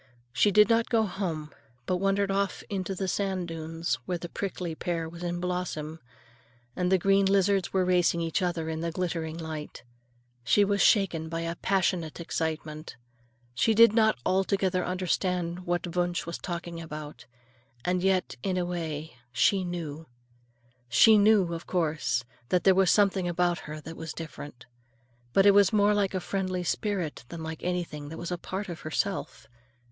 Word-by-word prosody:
She 130 +11 +4
did 210 +1 +6
not 230 0 +2
go 225 -2 +3
home, 170 -6 -4 0.3
but 180 - 0
wandered 195 +1 +1
off 195 0 -1
into 190 -1 -2
the 190 +1 -2
sand 190 -2 -1
dunes, 165 -3 -3
where 180 - -1
the 175 0 -7
prickly 180 -3 -4
pear 165 0 -3
was 170 +1 -10
in 175 0 -2
blossom 175 -3 -3 0.8
and 180 0 0
the 190 - +6
green 195 +2 +3
lizards 195 -1 +2
were 190 -1 +2
racing 180 -2 +3
each 165 +3 -1
other 175 -3 -1
in 160 0 -3
the 170 - -1
glittering 165 -2 -3
light. 160 -2 -6 0.6
She 205 +10 +4
was 200 0 +1
shaken 170 -6 +3
by 165 0 -3
a 165 0 -3
passionate 180 -4 0
excitement. 160 -1 -4 0.6
She 220 - +2
did 230 0 +7
not 220 -1 +4
altogether 190 -1 +1
understand 180 -1 -1
what 175 0 -2
Wunsch 175 -1 0
was 170 - -5
talking 170 -1 -5
about; 150 -6 -8 0.6
and 180 0 +1
yet, 185 -6 +1
in 185 -2 -1
a 180 - 0
way 160 -5 -4
she 190 +10 +3
knew. 165 -3 -5 0.8
She 220 - +7
knew, 200 -4 +4
of 165 - -6
course, 155 -8 0 0.3
that 180 - +2
there 190 - +6
was 190 -1 +4
something 195 -3 +3
about 175 0 +1
her 155 0 -5
that 160 +2 -8
was 160 -2 -6
different. 145 -6 -8 0.7
But 195 +9 +4
it 200 - +9
was 200 -1 +5
more 210 -1 +4
like 200 -2 0
a - - +1
friendly 185 0 -2
spirit 180 - -2
than 165 -1 -7
like 160 0 -6
anything 170 -5 -3
that 160 - -7
was 170 +1 -5
a 175 - -2
part 190 +3 -5
of 170 -3 -6
herself. 185 +5 -3
175 Hz, 170 wpm, -28 LUFS, 165-195 Hz, 0.8 s, it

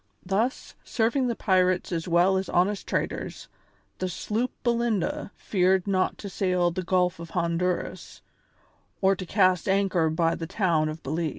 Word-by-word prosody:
Thus, 215 +8 -1
serving 250 +3 +1
the 235 - -1
pirates 185 -3 +1
as 165 -1 -2
well 175 +2 +4
as 190 0 -1
honest 195 +3 +1
traders, - - -3 0.5
the 185 - -1
sloop 220 +8 -2
Belinda 235 -6 0
feared 185 -1 +1
not 190 -2 0
to 205 - -7
sail 180 -2 +1
the 185 - -3
Gulf 180 -1 +1
of 170 0 -8
Honduras 170 +1 -2 0.8
or 195 0 +3
to 185 -1 -7
cast 185 -2 +2
anchor 190 -4 +2
by 165 +1 +1
the 165 - -5
town 170 -5 +1
of 155 +1 -7
Belize. 160 +4 -1
185 Hz, 155 wpm, -26 LUFS, 170-195 Hz, 0.8 s, well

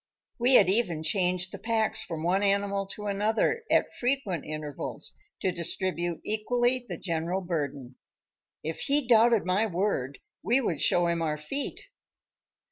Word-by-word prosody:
We 250 +2 +5
had 200 - +7
even 185 -6 0
changed 180 0 +1
the - - -8
packs 225 -1 0
from 160 -3 -5
one 185 +3 +2
animal 200 0 +1
to 210 +1 -7
another 215 - +1
at - - +2
frequent 245 - -1
intervals 155 -2 -6 0.3
to 185 - +1
distribute 175 0 -2
equally 240 +4 +1
the - - -4
general 170 +1 -2
burden. 145 -7 -4 0.7
If 160 +1 -4
he 285 0 +1
doubted 230 -3 +5
my 190 +5 +2
word 170 -8 -1 0.2
we 235 +8 +3
would 165 - -1
show 175 - +3
him 170 -1 0
our 155 -2 -1
feet. 275 - -3
190 Hz, 145 wpm, -28 LUFS, 170-220 Hz, 0.7 s, had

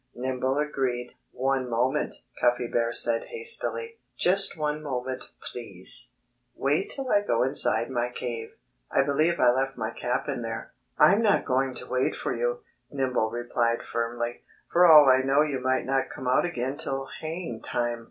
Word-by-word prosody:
Nimble 130 +2 -2
agreed. 130 -5 -2 0.2
"One 130 -1 -1
moment!" 120 +3 0 0.3
Cuffy 120 0 +2
Bear 115 0 0
said 115 -1 +3
hastily. 455 0 -1 0.2
"Just 195 0 +4
one 150 0 -2
moment, 130 -3 -4
please! 100 -7 -3 0.5
Wait 145 +8 0
till 270 -2 -4
I 205 - +4
go 120 - +1
inside 120 -2 +4
my 120 -1 -1
cave! 120 -2 -5 0.4
I - - +3
believe 155 +5 +1
I 125 -1 +5
left 135 +1 -1
my 110 -1 -3
cap 125 +4 -2
in 135 -4 -2
there." 115 -1 -6 0.2
"I'm 200 +4 +5
not 210 -3 +2
going 130 0 0
to - - -6
wait 130 0 -1
for - - -3
you," 120 +1 -2 0.3
Nimble 130 -5 -1
replied 120 0 -1
firmly. 120 0 -3 0.3
"For 175 +1 +6
all 150 -3 +9
I 130 0 +5
know 135 +3 +3
you 145 -4 -2
might 130 +1 0
not 135 0 0
come 130 - -7
out 130 +6 +3
again 135 -5 -3
till 135 -3 -3
haying 160 -7 -5
time." 120 0 -2
130 Hz, 165 wpm, -26 LUFS, 120-150 Hz, 0.5 s, all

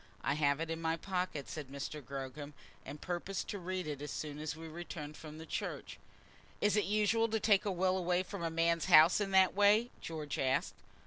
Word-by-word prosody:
"I - - +1
have 145 -1 +2
it 165 0 -3
in 165 0 -3
my 165 0 0
pocket," 180 -6 -3
said 150 -3 -6
Mr. 140 +2 -6
Gogram, 140 +2 -7 0.3
"and 145 +2 -8
purpose 180 +3 -3
to 205 - -5
read 185 0 -3
it 145 -2 -5
as 145 - -5
soon 150 -1 -5
as 155 +1 -3
we 165 0 -9
return 160 -2 -7
from 155 +1 -10
church." - - -5 0.6
"Is 210 0 +2
it 210 - +2
usual 215 +2 +2
to 220 0 0
take 205 -2 +3
a 205 - +1
will 185 0 +1
away 180 0 +1
from 195 0 -7
a 165 - -1
man's 165 0 +1
house 160 +6 +7
in 200 - -1
that 190 -1 +5
way?" 205 +4 +4
George 155 -3 -5
asked. 130 0 +1
165 Hz, 205 wpm, -34 LUFS, 150-190 Hz, 0.6 s, house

